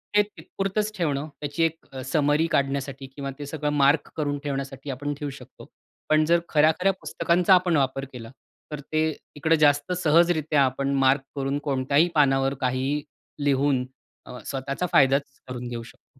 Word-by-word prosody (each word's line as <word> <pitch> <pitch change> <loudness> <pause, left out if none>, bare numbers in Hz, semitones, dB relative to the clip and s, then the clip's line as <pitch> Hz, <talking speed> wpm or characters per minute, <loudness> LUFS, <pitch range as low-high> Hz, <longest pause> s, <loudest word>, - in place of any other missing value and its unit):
ते 210 - +7
तिथं 205 - -15
पुरतंच 205 +2 0
ठेवणं 150 -4 -1
त्याची 145 +2 -2
एक 165 -4 -3
समरी 145 +2 +2
काढण्यासाठी 135 -1 -1
किंवा 140 -1 -4
ते 145 - -5
सगळं 150 0 -3
मार्क 145 +1 +3
करून 145 -2 -1
ठेवण्यासाठी 135 -1 -5
आपण 145 +2 -3
ठेऊ 145 - -3
शकतो. 140 - -12 0.4
पण 155 0 +4
जर 170 +2 +4
खऱ्या-खऱ्या 160 +5 +3
पुस्तकांचा 170 +4 +2
आपण 180 -3 +3
वापर 135 0 0
केला 115 -2 -8 0.4
तर 150 - -4
ते 155 +2 -2 0.3
इकडे 160 +2 +2
जास्त 145 +2 +3
सहजरित्या 160 -2 +3
आपण 135 +2 -1
मार्क 135 +1 +4
करून 135 0 -1
कोणत्याही 140 +4 +2
पानावर 135 -2 +3
काही 130 +3 0 0.4
लिहून 135 -2 +2 0.4
अ, 125 - -9
स्वतःचा 140 +5 -3
फायदाचं 135 0 +3
करून 125 -1 -6
घेऊ 120 -1 -5
शकतो. 125 +3 -19
145 Hz, 155 wpm, -25 LUFS, 135-155 Hz, 0.4 s, ते